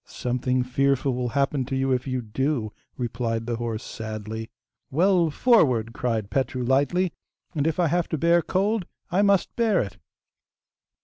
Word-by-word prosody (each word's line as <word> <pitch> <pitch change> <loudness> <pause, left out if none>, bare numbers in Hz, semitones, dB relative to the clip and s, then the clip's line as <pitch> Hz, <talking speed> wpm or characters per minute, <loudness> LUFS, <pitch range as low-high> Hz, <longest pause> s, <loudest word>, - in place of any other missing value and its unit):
'Something 125 +1 -1
fearful 135 +1 +1
will 125 0 -2
happen 140 +1 +1
to 135 +1 -3
you 135 0 +1
if 125 +1 0
you 130 -1 -2
do,' 115 0 -1 0.2
replied 115 -2 -2
the 120 -1 -2
horse 115 -1 -3
sadly. 110 0 -6 0.4
'Well, 175 +2 +3
forward!' 130 - +3
cried 110 -5 -2
Petru 130 -2 -1
lightly, 145 +8 +2 0.4
'and 150 -2 0
if 160 +2 -1
I 175 - +4
have 170 +2 +1
to 160 - -1
bear 170 +3 +4
cold, 195 +2 0 0.2
I 185 +3 +3
must 200 -2 +2
bear 225 -5 +2
it! 100 -1 -4
130 Hz, 160 wpm, -25 LUFS, 120-165 Hz, 0.4 s, I